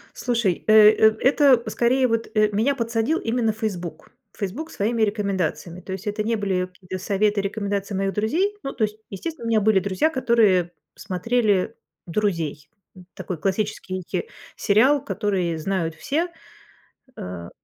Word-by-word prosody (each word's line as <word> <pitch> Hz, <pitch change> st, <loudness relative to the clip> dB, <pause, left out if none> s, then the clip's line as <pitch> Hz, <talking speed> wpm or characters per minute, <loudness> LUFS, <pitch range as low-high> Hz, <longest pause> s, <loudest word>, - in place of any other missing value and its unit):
Слушай, 230 Hz, -8 st, 0 dB
э, 215 Hz, -, +5 dB, 0.2 s
э 220 Hz, 0 st, +4 dB
это 265 Hz, -2 st, +5 dB
скорее 245 Hz, +4 st, +2 dB
вот, 230 Hz, -1 st, -1 dB
э, 215 Hz, 0 st, +4 dB
меня 230 Hz, +8 st, +1 dB
подсадил 230 Hz, +5 st, 0 dB
именно 225 Hz, -1 st, 0 dB
Facebook 200 Hz, -6 st, -5 dB, 0.3 s
Facebook 240 Hz, -, -4 dB
своими 225 Hz, +3 st, -1 dB
рекомендациями, 190 Hz, -4 st, -2 dB
то 190 Hz, -, -9 dB
есть 190 Hz, +3 st, -6 dB
это 210 Hz, +1 st, -1 dB
не 230 Hz, +2 st, 0 dB
были 190 Hz, -3 st, 0 dB
какие-то 185 Hz, 0 st, -8 dB
советы 205 Hz, 0 st, +1 dB
и -, -, -11 dB
рекомендации 200 Hz, 0 st, -3 dB
моих 195 Hz, 0 st, -1 dB
друзей. 330 Hz, -, 0 dB
Ну, 275 Hz, -, -3 dB
то 220 Hz, -, +1 dB
есть, 210 Hz, 0 st, -8 dB
естественно, 235 Hz, -, -6 dB
у -, -, -2 dB
меня 225 Hz, -1 st, +4 dB
были 210 Hz, -1 st, +3 dB
друзья, 195 Hz, -, +1 dB
которые 220 Hz, -, +2 dB, 0.2 s
смотрели 205 Hz, +2 st, 0 dB, 0.3 s
"Друзей". 165 Hz, -6 st, -2 dB, 0.3 s
Н 185 Hz, -1 st, -14 dB
такой 180 Hz, -, -5 dB
классический, 190 Hz, 0 st, -2 dB
э, -, -, 0 dB, 0.3 s
сериал, 260 Hz, +8 st, +3 dB
который 185 Hz, -, -1 dB
знают 165 Hz, -1 st, -2 dB
все. 330 Hz, -, -1 dB, 0.9 s
Э, 90 Hz, -2 st, -7 dB
210 Hz, 155 wpm, -23 LUFS, 185-230 Hz, 0.9 s, э